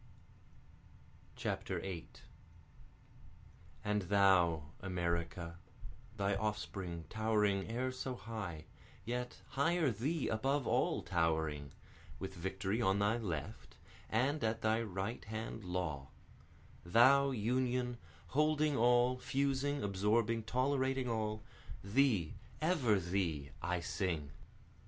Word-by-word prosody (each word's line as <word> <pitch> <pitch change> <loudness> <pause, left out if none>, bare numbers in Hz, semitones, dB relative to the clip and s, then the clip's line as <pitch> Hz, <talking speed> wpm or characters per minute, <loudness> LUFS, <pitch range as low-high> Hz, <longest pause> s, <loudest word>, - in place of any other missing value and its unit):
8 90 -4 -4 1.6
And 105 0 +1
thou 90 -6 +3
America, 85 -2 -2 0.6
Thy 100 0 +1
offspring 95 -5 -3
towering 105 -2 +1
e'er 125 +3 -1
so 130 0 -4
high, 105 -9 -6 0.4
yet 125 +1 -4
higher 155 +1 +2
Thee 140 +9 -1
above 135 +5 +1
all - - +1
towering, 80 -4 0 0.5
With 95 0 -5
Victory 95 +4 -2
on 95 -3 +3
thy 105 +3 +2
left, 85 -11 -5 0.3
and 130 +6 +1
at 110 0 0
thy 110 +1 +3
right 100 +1 -3
hand 110 0 -5
Law; 85 -7 -2 0.8
Thou 130 +9 +6
Union 125 +1 0 0.3
holding 150 0 +2
all, 125 +1 +4
fusing, 140 +2 0
absorbing, 105 +3 +2
tolerating 130 +1 +1
all, 110 -2 -1 0.4
Thee, 105 - +2 0.3
ever 145 - +3
thee, 85 -6 -1
I 90 +2 -1
sing. 85 -5 -2
110 Hz, 95 wpm, -36 LUFS, 90-125 Hz, 1.6 s, Thou